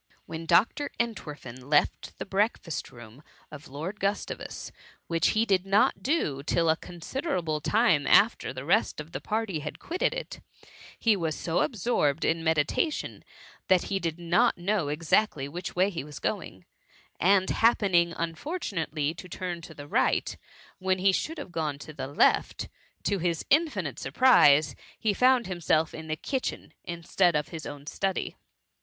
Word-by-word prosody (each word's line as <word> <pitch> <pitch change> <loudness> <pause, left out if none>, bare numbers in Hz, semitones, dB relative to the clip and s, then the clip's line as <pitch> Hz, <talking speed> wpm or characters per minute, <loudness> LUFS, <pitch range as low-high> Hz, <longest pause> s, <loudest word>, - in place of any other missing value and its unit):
When 165 0 -7
Dr. 220 - +3
Entwerfen 145 - -5
left 145 -1 +1
the - - -5
breakfast 195 - -1
room 120 +1 -13 0.3
of 150 0 -10
Lord 160 +10 -6
Gustavus, 200 +1 -3 0.3
which 165 -1 +1
he 225 - +4
did 190 -4 +2
not 195 -1 +2
do 190 - 0
till 160 +3 +2
a - - +2
considerable 175 - -3
time 210 - +3
after 225 +3 +4
the 130 +1 -7
rest 195 +3 +2
of 150 +2 -8
the - - -5
party 215 -6 -2
had 150 0 -6
quitted 355 +3 -1
it, - - -6 0.6
he 225 -2 +3
was 165 -5 -2
so 165 0 -1
absorbed 175 - +1
in 165 0 +1
meditation 160 - 0 0.4
that 185 -2 +4
he 195 - +1
did 165 -3 -3
not 175 +8 +2
know 180 -2 0
exactly 150 0 +1
which 175 +5 -6
way 185 +3 +3
he 165 -7 -4
was 150 0 -10
going; - - -4 0.5
and, 190 +1 +3
happening 190 -7 +3
unfortunately 165 - -2
to 180 +2 -11
turn 175 -2 -4
to 160 -1 -11
the 145 0 -9
right - - +1 0.4
when 185 0 +1
he 190 +1 +4
should 320 - -2
have - - -7
gone 155 -4 -2
to 155 +2 -10
the 135 - -5
left, 145 - +2 0.3
to 200 -1 0
his 170 -2 -1
infinite 245 - +1
surprise 150 - +5 0.2
he 215 -3 +1
found 250 +2 +4
himself 165 -3 0
in 160 0 -8
the 155 0 -2
kitchen^ 265 - -3
instead 170 0 +1
of 150 0 -1
his 160 -3 -7
own 145 -1 -8
study. 195 +5 -2
170 Hz, 160 wpm, -28 LUFS, 155-205 Hz, 0.6 s, surprise